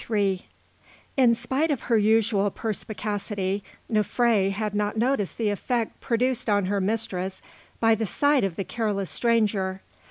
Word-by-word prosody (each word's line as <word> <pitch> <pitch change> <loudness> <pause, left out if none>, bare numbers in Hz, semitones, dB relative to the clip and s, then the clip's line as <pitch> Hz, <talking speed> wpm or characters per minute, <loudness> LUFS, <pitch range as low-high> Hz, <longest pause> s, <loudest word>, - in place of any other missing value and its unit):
III 200 -4 0 0.7
In 245 -4 +5
spite 280 +7 0
of 280 -5 0
her 235 - +1
usual 210 -1 +3
perspicacity, 205 -2 -3 0.2
Nofré 215 -1 +2
had 210 +1 -2
not 210 +1 -1
noticed 235 -4 0
the 220 -3 +1
effect 230 +3 -2
produced 245 0 0
on 205 -2 +3
her 200 +1 0
mistress 190 -2 -2 0.4
by 225 0 +4
the 220 0 -1
sight 285 +6 +2
of 190 -4 -1
the 195 - -2
careless 205 -3 -2
stranger. 205 -5 +1
215 Hz, 145 wpm, -25 LUFS, 200-230 Hz, 0.7 s, In